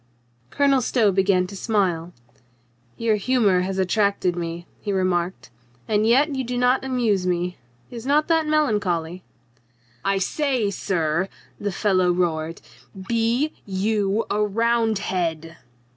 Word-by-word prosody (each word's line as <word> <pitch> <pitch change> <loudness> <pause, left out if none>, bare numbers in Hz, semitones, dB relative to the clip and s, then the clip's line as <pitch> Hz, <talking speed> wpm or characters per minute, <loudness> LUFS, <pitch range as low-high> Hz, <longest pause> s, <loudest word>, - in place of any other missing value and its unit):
Colonel 275 - +2
Stow 225 -4 +2
began 190 -1 +2
to 195 +2 -9
smile. 185 -6 0 0.9
"Your 225 -2 +1
humor 205 -5 +2
has 190 +1 -3
attracted 190 -1 +1
me," 170 0 -5
he 205 - -4
remarked, 175 - -1 0.4
"and 215 0 +2
yet 280 +6 +4
you 265 - -1
do 245 0 -3
not 250 +2 +2
amuse 230 -8 0
me. 180 0 -1 0.3
Is 235 -2 -7
not 290 +4 +2
that 325 -2 +2
melancholy?" 200 - 0 0.8
"I 195 0 +1
say, 245 +1 0
sir," 175 -2 -1 0.3
the 205 0 -2
fellow 185 -2 +2
roared, 165 -2 -1 0.5
"be 235 +6 +1
you 205 +2 0
a 210 +1 +1
Round 225 +1 +1
head?" 165 -4 -3
200 Hz, 130 wpm, -23 LUFS, 180-235 Hz, 0.9 s, yet